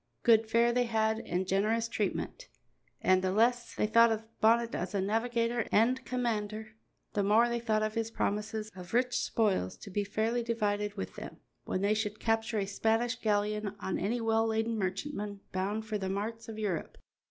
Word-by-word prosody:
Good 225 -2 +5
fare 235 +1 +4
they 245 0 +2
had 220 -1 +1
and 180 +2 -1
generous 215 +4 +1
treatment, 230 - -3 0.5
and 185 0 +4
the 185 0 0
less 235 +4 +2
they - - +1
thought 230 +2 +5
of 220 0 -2 0.2
Bonnet 230 +1 +4
as 185 +4 -3
a - - +2
navigator 230 +3 0
and 250 +4 +3
commander, 220 -3 -2 0.4
the 205 - +1
more 215 +4 +4
they 235 0 -1
thought 215 -2 +1
of 215 0 -1
his 225 -1 -1
promises 215 0 -2
of 180 +3 -7
rich 250 0 +2
spoils 195 - 0
to 200 - -10
be 205 +2 0
fairly 220 +4 0
divided 210 -3 -1
with 195 - -6
them - - -8 0.3
when 185 - -2
they 200 +2 +3
should 215 -1 -2
capture 225 0 0
a 200 - +1
Spanish 225 +4 +1
galleon 210 0 0
or 190 - -5
any 205 +6 -1
well 225 0 +2
laden 225 +1 0
merchantman 200 +1 -3
bound 200 +4 -2
for 215 -1 -2
the 190 -1 -3
marts 220 +4 -4
of 220 - -7
Europe. 205 -6 -3
220 Hz, 185 wpm, -31 LUFS, 205-230 Hz, 0.5 s, Good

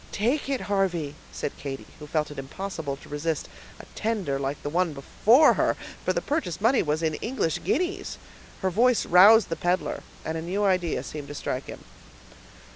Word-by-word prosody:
"Take 250 +7 0
it, 270 -2 0
Harvey," 180 -7 0 0.2
said - - -4
Katy, 135 -1 -6
who 150 - -9
felt 150 0 -1
it 145 - -7
impossible 150 0 -5
to 140 - -15
resist 150 +2 -2 0.3
a - - -10
tender 200 -12 -1
like 140 +1 -3
the 145 - -2
one 175 -1 +1
before 230 - +5
her; - - +1 0.3
for - - +1
the - - -1
purchase 285 - -2
money 230 +5 +4
was 155 +1 -1
in 160 -1 +1
English 225 - -1
guineas. 365 +6 -1 0.5
Her 190 - +2
voice 240 +4 +3
roused 205 +5 +7
the 165 - -1
peddler, 175 +2 -1 0.2
and 160 +1 -2
a - - -5
new 185 +5 -1
idea 180 -4 +1
seemed 150 -2 -7
to 145 - -8
strike 130 -2 -3
him. - - -9
175 Hz, 185 wpm, -26 LUFS, 150-220 Hz, 0.5 s, roused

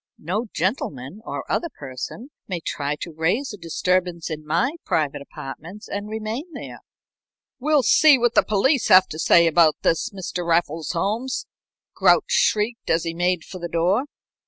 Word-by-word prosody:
"No 205 +9 -3
gentleman 175 - -3
or - - -4
other 340 - -1
person 150 - -8 0.2
may 180 -3 -3
try 145 -2 -3
to 170 - -5
raise 185 - 0
a - - -8
disturbance 175 0 -1
in 155 -1 -5
my 200 - 0
private 145 -2 -1
apartments 165 +9 -9
and 205 +1 -5
remain 220 +9 -5
there." - - -8 0.8
"We'll 295 +1 +2
see 295 +4 +6
what 240 -1 +1
the - - +6
police 230 +6 +1
have 185 0 +7
to 155 - -7
say 170 +1 +5
about 165 -1 +4
this, 165 - +1
Mr. 185 -2 -5
Raffles 165 -2 0
Holmes," 215 +9 -2 0.5
Grouch - - +3
shrieked, 220 +3 +1
as 165 0 +2
he 165 - -3
made 175 0 0
for 185 - -9
the 170 - -4
door. 180 +10 +1
180 Hz, 160 wpm, -23 LUFS, 165-220 Hz, 0.8 s, have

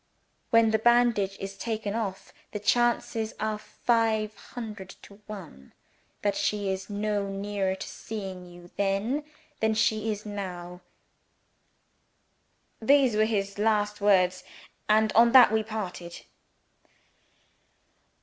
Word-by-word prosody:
When 230 -1 +5
the 220 - +2
bandage 235 -4 +3
is 195 0 -6
taken 220 -3 -3
off, 200 -4 -4 0.2
the 210 - -3
chances 225 0 +1
are 215 0 -2
five 220 -2 0
hundred 210 -5 -8
to 200 +1 -15
one 185 - -10 0.5
that 205 -1 +1
she 205 -2 -1
is 190 +1 -5
no 205 -1 -1
nearer 195 -1 -2
to 190 - -7
seeing 190 -4 -7
you 175 0 -14
then 200 +9 0 0.4
than 220 0 +1
she 220 0 +1
is 210 0 -6
now.' 180 -3 -6 2.0
These 265 -1 +4
were 215 +1 +4
his 200 -2 -2
last 210 -1 +1
words 185 -2 +3 0.5
and 215 0 +4
on 235 +1 +5
that 250 -4 +9
we 220 0 +2
parted." 190 -6 -6
210 Hz, 120 wpm, -27 LUFS, 195-220 Hz, 2.0 s, that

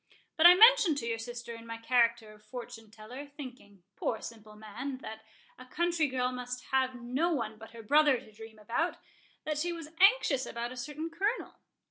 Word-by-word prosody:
But 320 +1 +8
I 355 - +9
mentioned 435 -7 +7
to 260 - -3
your 230 -1 -2
sister 240 0 -7
in 230 0 -11
my 230 0 -6
character 230 -2 +1
of 210 0 -20
fortune 240 -3 -9
teller,—thinking, 245 - -11
poor 220 - -2
simple 215 -2 -10
man, 220 +6 -6
that 220 0 -8 0.4
a 255 - -12
country 340 +1 0
girl 255 -1 -1
must 250 0 -6
have 260 -1 +1
no 260 +9 -1
one 225 -7 -3
but 225 - -11
her 230 0 -11
brother 295 +3 +4
to - - -16
dream 220 +1 -12
about,—that 295 +5 -4
she 345 +3 -1
was 330 -3 -7
anxious 385 - +4
about 235 +1 -4
a - - -8
certain 300 +6 -5
Colonel. 400 +8 -2
250 Hz, 180 wpm, -30 LUFS, 225-300 Hz, 0.4 s, I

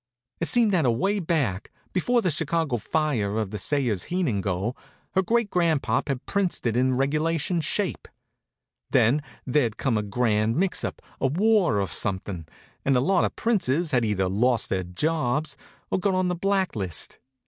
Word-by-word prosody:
It 170 - 0
seemed 235 -4 +3
that 180 -5 +2
away 135 - +1
back, 145 - -1 0.2
before 235 +6 +2
the 180 - +2
Chicago 160 -3 0
fire 120 -5 -1
or 110 -1 0
the 105 +1 -6
Sayers 125 -7 0
Heenan 165 - 0
go, 100 +6 -2 0.4
her 190 - +2
great 225 +2 +1
grandpop 165 -5 +1
had 135 -3 -3
princed 200 -8 -1
it 115 -2 +1
in 130 +1 +2
regulation 160 +5 0
shape. - - -1 0.8
Then 130 +7 +3 0.2
there'd 125 -4 +1
come 120 -6 +1
a - - 0
grand 110 +1 +1
mix 185 +3 +1
up, - - -5 0.2
a - - +2
war 185 - +3
or 100 - 0
something, 95 -5 -3 0.4
and 135 -2 +3
a - - +4
lot 175 +7 +3
of - - -3
princes 175 - +1
had 125 -4 +2
either 100 -4 +1
lost 115 +6 +1
their 95 - +1
jobs 145 - -1 0.4
or - - +1
got 195 0 +1
on 185 -1 +1
the 180 - 0
blacklist. 180 - -1
140 Hz, 170 wpm, -25 LUFS, 110-180 Hz, 0.8 s, a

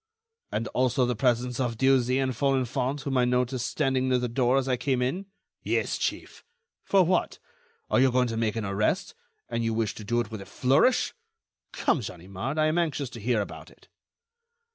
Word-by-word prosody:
"And 115 - -2
also 130 0 +2
the 125 0 -1
presence 125 +1 0
of 120 -3 -1
Dieuzy 130 0 +3
and 130 -1 0
Folenfant, 135 +1 0
whom 135 -2 0
I 125 - +4
noticed 125 0 0
standing 130 -3 0
near 130 - +3
the 125 0 -1
door 125 +2 +2
as 135 -1 0
I 130 - +2
came 130 0 0
in?" 145 +11 -2 0.3
"Yes, - - -1
chief." - - -4 0.4
"For 195 -2 +4
what? 180 +1 0 0.5
Are - - +2
you 130 0 +5
going 125 0 +2
to 115 - -3
make 110 -1 0
an 110 -2 -2
arrest, 105 - 0 0.3
and 115 - -2
you 115 -1 0
wish 110 -2 0
to 110 - -9
do 120 +3 0
it 115 -2 -3
with 110 -3 -6
a 95 - -10
flourish? 135 - +2 0.6
Come, - - +1
Ganimard, 100 - -5
I 155 - +3
am 155 +3 +2
anxious 145 -6 -1
to 115 - -8
hear 115 0 +1
about 100 - -8
it." - - -22
125 Hz, 195 wpm, -27 LUFS, 115-135 Hz, 0.6 s, you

